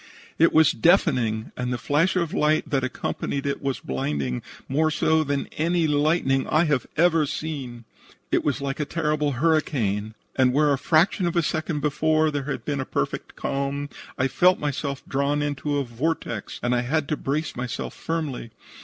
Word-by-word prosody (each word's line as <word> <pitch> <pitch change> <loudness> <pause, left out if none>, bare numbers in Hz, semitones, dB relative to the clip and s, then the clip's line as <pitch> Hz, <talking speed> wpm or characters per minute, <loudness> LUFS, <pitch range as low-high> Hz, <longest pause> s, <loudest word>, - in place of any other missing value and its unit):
It 165 - +6
was 155 -1 +5
deafening, 125 - +2
and 125 0 -3
the 125 - -1
flash 150 +10 +1
of 170 -3 0
light 155 +1 +2
that 135 -2 +1
accompanied 135 +1 -3
it 140 - -2
was 135 -2 -2
blinding, 65 -1 -2 0.3
more 155 +4 +2
so 160 +1 +2
than 140 -1 -1
any 170 +1 +2
lightning 145 -2 +2
I 155 +2 +3
have 145 -6 0
ever 165 -2 +4
seen. 140 -5 -5 0.5
"It - - +2
was 145 -1 0
like 140 +1 -3
a 150 - 0
terrible 150 -2 0
hurricane, 120 -8 0 0.2
and 130 -1 +3
where 145 +1 +4
a 135 - -1
fraction 175 +4 +3
of 170 - -2
a 170 - +3
second 155 -1 -2
before 155 +2 +2
there 145 -2 -3
had 145 - -4
been 145 -2 -1
a - - -1
perfect - - -3
calm, 140 +1 -2 0.3
I 130 - +2
felt 180 +6 +4
myself 140 -1 -3
drawn 140 +2 0
into 145 0 -1
a 140 - +1
vortex 120 -3 -3
and 120 +1 +1
I 120 - +2
had 145 +4 0
to 155 - +1
brace 150 +3 -2
myself 125 -1 -4
firmly. 155 -8 -3
145 Hz, 180 wpm, -24 LUFS, 130-155 Hz, 0.5 s, It